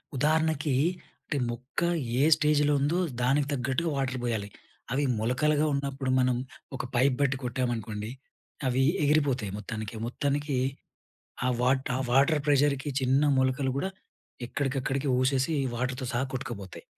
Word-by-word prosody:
ఉదాహరణకి, 155 0 +1 0.5
అంటే 145 - -2
మొక్క, 125 +3 -5 0.4
ఏ - - +5
స్టేజ్‌లో 150 -1 +3
ఉందో, 150 +6 +1 0.2
దానికి 140 +3 +2
తగ్గట్టుగా 140 +5 -1
వాటర్ 130 -1 -1
పోయాలి. 110 -4 -2 0.4
అవి 140 +3 +1 0.2
మొలకలుగా 145 +7 +2
ఉన్నప్పుడు 140 -1 -2
మనం, 125 -1 +3 0.4
ఒక - - -4
పైప్ 130 +2 +4
బట్టి 135 -1 +2
కొట్టామనుకోండి, 115 -4 -2 0.6
అవి 130 +1 +2 0.2
ఎగిరిపోతాయి 140 -8 +2
మొత్తానికే. 110 0 -5
మొత్తానికి, 145 +2 -1 0.9
ఆ - - +3
వాట 130 +1 +2 0.2
వాటర్ 140 +4 +4
ప్రెషర్‌కి 145 -1 +2
చిన్న 130 +2 +3 0.2
మొలకలు 130 0 +1
గూడా, 190 +8 -1 0.6
ఎక్కడికక్కడికి 135 +1 -1
ఊసేసి, 135 +4 +1 0.2
వాటర్‌తో 125 +1 -2
సహా 125 +3 0
కొట్టుకపోతాయి. 120 -8 -6
135 Hz, 120 wpm, -28 LUFS, 125-145 Hz, 0.9 s, ఏ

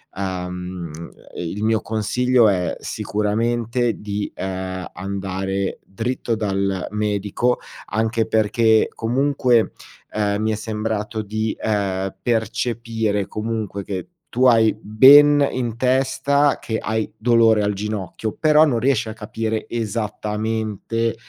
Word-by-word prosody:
ehm, 90 -2 -4 0.5
il 90 +5 -4
mio 110 0 +2
consiglio 120 +2 +2
è 90 -2 0
sicuramente 115 +3 -1
di, 105 0 -3
ehm, 95 -1 -4
andare 95 0 -3
dritto 115 +3 -2
dal 100 -3 -1
medico, 105 +3 0 0.3
anche 110 +2 0
perché 110 +1 +3
comunque, 125 -1 +2 0.4
ehm, 105 -1 0
mi 110 0 +1
è - - 0
sembrato 110 0 -3
di, 110 +1 -2
ehm, 95 -3 -1
percepire 115 -2 -1
comunque 105 -2 -4
che 95 -2 -5 0.3
tu 125 +2 +3
hai 115 -3 +5
ben 145 +6 +7
in 120 -3 -3
testa 135 +3 +2
che 110 -1 -3
hai 110 0 -1
dolore 115 -1 +4
al 105 0 +1
ginocchio, 105 +1 -4
però 155 0 +6
non 125 -6 +1
riesci 120 -2 +1
a 110 - -5
capire 110 0 -3
esattamente, 110 0 -2
110 Hz, 115 wpm, -21 LUFS, 100-115 Hz, 0.5 s, ben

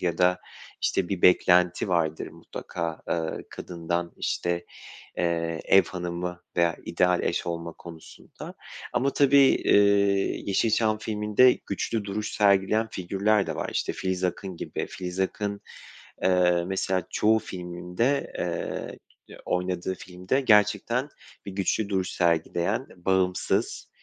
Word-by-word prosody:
Ya 85 -2 -1
da, 90 0 +3 0.4
işte, 90 - +1
bir 95 -3 -3
beklenti 90 0 +4
vardır, 80 -3 0
mutlaka, 85 -2 -6
aaa, 80 -1 -2
kadından. 85 0 -4
İşte, 85 0 -2 0.5
eee, 85 -2 -1
ev 95 - +6
hanımı 90 0 -5 0.2
veya 85 -1 +3
ideal 90 +1 +2
eş - - -1
olma 85 -1 -4
konusunda. 85 -2 -11 0.4
Ama 130 +3 +2
tabii, 140 0 +5
iii, 100 -7 +3
Yeşilçam 110 +1 +2
filminde 105 +3 +3
güçlü 110 -3 -2
duruş 105 +2 -3
sergileyen 105 +2 +3
figürler 100 +3 +1
de - - -3
var. - - -3
İşte, - - -1
Filiz 95 -1 -2
Akın 95 0 -2
gibi. - - -4
Filiz 90 0 -6
Akın, 100 +1 -2 0.6
eee, 90 -2 +3
mesela, 95 -1 -1
çoğu 110 +1 +3
filminde, 90 +8 -2
eee, 85 -1 -6
oynadığı 90 +1 -1
filmde 90 +10 -2
gerçekten 110 +3 +3 0.4
bir 100 - -6
güçlü 100 +2 -1
duruş 95 -2 -1
sergileyen, 85 - 0
bağımsız, 90 0 0
95 Hz, 120 wpm, -26 LUFS, 85-105 Hz, 0.6 s, ev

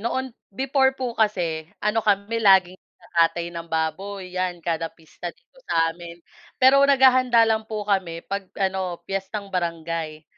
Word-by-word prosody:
noon 255 +3 -2 0.2
before 265 +4 +1
po 255 -2 -3
kasi 175 -8 -1 0.2
ano 210 +2 +2
kami 210 +2 0
laging 190 -3 +5
nagkakatay 170 0 -1
ng 170 0 -7
baboy 180 +4 -3
yan 180 -2 -3
kada 165 -1 -1
pista 165 +2 -10
dito - - -17
sa 165 0 +2
amin, 170 0 -10 0.4
pero 265 +2 +6
naghahanda 255 -3 +5
lang 220 -1 0
po 215 -2 -4
kami 185 -5 -1
'pag 200 -1 -4
ano, 185 -3 -2
piyestang 195 +2 -5
barangay, 165 -3 -3
190 Hz, 145 wpm, -23 LUFS, 170-225 Hz, 0.4 s, pero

